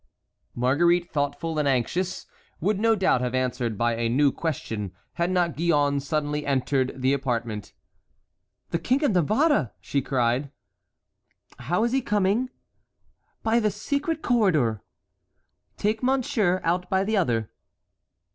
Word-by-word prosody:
Marguerite, 170 +8 +2
thoughtful 145 +2 -2
and 150 - +1
anxious, 140 +8 -1 0.3
would 200 +4 0
no 225 +1 +3
doubt 190 - +2
have 125 0 -1
answered 125 -3 -1
by 120 +1 +1
a 115 0 -1
new 140 +4 +3
question, 110 - -4 0.2
had 170 0 0
not 175 -4 +1
Gillonne 145 -3 +2
suddenly 150 0 -2
entered 135 -1 0
the 130 +1 +3
apartment. 120 -6 -3 1.0
"The 170 - 0
King 260 - +1
of 285 - +3
Navarre!" 210 - +2
she 140 - -1
cried. 130 +1 0 1.1
"How 170 - 0
is 235 - +1
he 265 +1 +2
coming?" 210 +3 +1 0.9
"By 225 +1 +3
the 215 -2 +2
secret 285 - -2
corridor." 155 - +2 1.0
"Take 215 +1 0
monsieur 235 -8 +1
out 180 +2 0
by 190 0 +2
the 220 +2 0
other." 115 - 0
160 Hz, 130 wpm, -25 LUFS, 130-205 Hz, 1.1 s, no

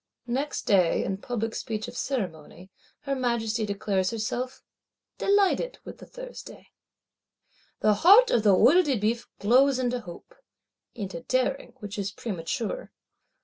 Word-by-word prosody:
Next 265 +5 -2
day, 185 -5 +3
in 190 - -2
public 225 +1 -3
speech 220 0 -4
of 240 - -9
ceremony, 185 - -5 0.3
her 275 - -2
Majesty 230 -3 -1
declares 195 -2 -1
herself 240 +3 -4 0.6
"delighted 405 +5 +2
with - - -10
the - - -12
Thursday." - - -11 1.1
The 215 - +4
heart 420 +8 +7
of 235 - +3
the 205 -3 +5
Œil 290 - +6
de 275 -8 0
Bœuf 230 +3 -1
glows 255 +6 +4
into 250 -1 -1
hope; 175 -7 -12 0.6
into 190 -7 -5
daring, 255 +6 -1
which 205 0 -6
is 195 -1 -2
premature. 220 - -4
230 Hz, 135 wpm, -26 LUFS, 200-260 Hz, 1.1 s, heart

